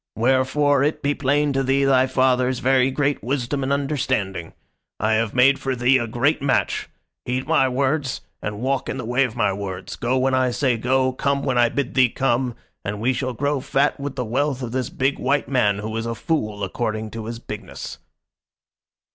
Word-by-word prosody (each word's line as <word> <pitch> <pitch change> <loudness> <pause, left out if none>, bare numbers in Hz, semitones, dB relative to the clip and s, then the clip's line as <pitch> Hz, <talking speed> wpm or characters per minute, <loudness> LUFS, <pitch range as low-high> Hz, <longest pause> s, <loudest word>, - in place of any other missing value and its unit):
Wherefore 130 +4 +2
it 150 +2 -1
be 145 +1 +2
plain 145 +1 +1
to 135 - +1
thee 135 +1 +2
thy 130 -1 +4
father's 130 -1 +2
very 130 +1 +3
great 145 +1 -1
wisdom 135 +2 -1
and 135 +1 -1
understanding. 135 - -1 0.5
I 110 +1 +1
have 110 0 0
made 135 +2 +5
for 135 -1 -2
thee 125 +2 +3
a 120 - -2
great 120 +7 +1
match. 135 -1 0 0.4
Heed 125 +1 -2
my 130 - +3
words 135 +2 -1 0.2
and 105 0 -5
walk 135 +1 -1
in - - -3
the 130 - -5
way 125 +3 +2
of 115 - -6
my 105 -4 +1
words, 95 -2 -6
go 125 +2 0
when 130 +1 +1
I 130 -1 +3
say 125 0 +1
go, 130 +3 +1
come 140 +1 0
when 130 -3 +1
I 120 -1 +5
bid 140 -1 -2
thee 130 -2 +4
come, 125 -1 0 0.3
and 105 +1 -4
we 125 +4 +1
shall 130 0 -2
grow 140 +4 0
fat 140 +3 +1
with 140 -1 -4
the 125 - -2
wealth 135 +3 -1
of 120 - -4
this 130 0 -2
big 135 +2 -1
white 140 +2 +1
man 120 -7 +2
who 110 +2 -5
is 115 0 -2
a 115 - -3
fool 105 -6 -2
according 110 +2 -3
to 115 -1 -6
his 115 +1 -5
bigness." 110 -2 -8
130 Hz, 200 wpm, -22 LUFS, 115-135 Hz, 0.5 s, made